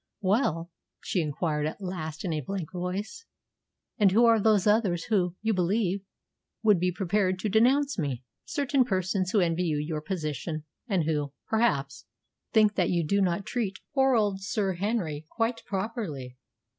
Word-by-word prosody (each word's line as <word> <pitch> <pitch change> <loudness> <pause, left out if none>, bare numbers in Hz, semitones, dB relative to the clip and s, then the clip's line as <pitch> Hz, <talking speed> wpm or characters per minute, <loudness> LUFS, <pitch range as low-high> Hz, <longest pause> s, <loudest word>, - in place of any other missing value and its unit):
"Well," 185 - +1 0.3
she 180 - -1
inquired 150 0 -1
at 155 - -6
last 175 -4 -5
in 170 - -1
a 155 - -1
blank 185 +1 -5
voice, 190 - -4 0.7
"and 200 -3 +5
who 230 +5 +5
are 230 -1 +5
those 210 -3 +4
others 210 -6 +2
who, 180 -5 +1
you 220 0 +2
believe, 190 +1 +1 0.6
would 210 -5 +5
be 180 +1 +1
prepared 185 +1 0
to 205 +3 -2
denounce 260 +5 +3
me?" 135 -6 -2 0.2
"Certain 280 -2 +1
persons 185 -3 0
who 205 +1 +3
envy 175 +1 +1
you 155 -3 0
your 150 +1 -3
position, 155 -2 -4 0.2
and 190 -7 +1
who, 150 -3 -1
perhaps, 150 -12 0 0.5
think 215 -2 +5
that 180 -4 +1
you 170 -2 +1
do 200 +6 +2
not 185 +1 0
treat 210 -6 -2 0.2
poor 265 -2 +4
old 205 -3 +1
Sir 200 -2 -1
Henry 175 -6 -2
quite 230 0 -1
properly." 190 - -4
190 Hz, 160 wpm, -28 LUFS, 165-215 Hz, 0.7 s, and